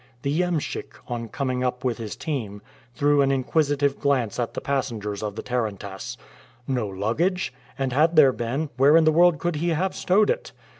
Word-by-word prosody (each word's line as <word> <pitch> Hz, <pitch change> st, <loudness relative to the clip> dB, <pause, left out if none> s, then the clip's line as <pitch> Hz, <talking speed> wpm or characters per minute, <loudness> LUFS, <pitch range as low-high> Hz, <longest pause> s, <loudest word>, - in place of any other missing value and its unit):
The 145 Hz, +4 st, 0 dB
iemschik, 175 Hz, -4 st, -2 dB
on 120 Hz, -2 st, -4 dB
coming 130 Hz, -1 st, -2 dB
up 125 Hz, -1 st, -2 dB
with 125 Hz, -3 st, -1 dB
his 110 Hz, -2 st, -5 dB
team, 110 Hz, -10 st, -4 dB, 0.3 s
threw 145 Hz, +3 st, +3 dB
an 135 Hz, 0 st, +3 dB
inquisitive 140 Hz, +1 st, +1 dB
glance 130 Hz, -6 st, 0 dB
at 120 Hz, -, -2 dB
the -, -, -1 dB
passengers 115 Hz, -7 st, -2 dB
of 105 Hz, -2 st, -4 dB
the -, -, -5 dB
tarantass. 105 Hz, -6 st, -4 dB, 0.5 s
No 125 Hz, -5 st, -1 dB
luggage! 125 Hz, -, -1 dB, 0.2 s
and 135 Hz, -2 st, -1 dB
had 160 Hz, +5 st, +3 dB
there 140 Hz, -4 st, +7 dB
been, 135 Hz, +7 st, -3 dB
where 140 Hz, +4 st, +6 dB
in 165 Hz, -, +5 dB
the 155 Hz, -, +5 dB
world 170 Hz, 0 st, +5 dB
could 170 Hz, +1 st, -2 dB
he 170 Hz, +3 st, 0 dB
have 180 Hz, +4 st, 0 dB
stowed 205 Hz, +4 st, +3 dB
it? -, -, -4 dB
135 Hz, 185 wpm, -24 LUFS, 115-155 Hz, 0.5 s, there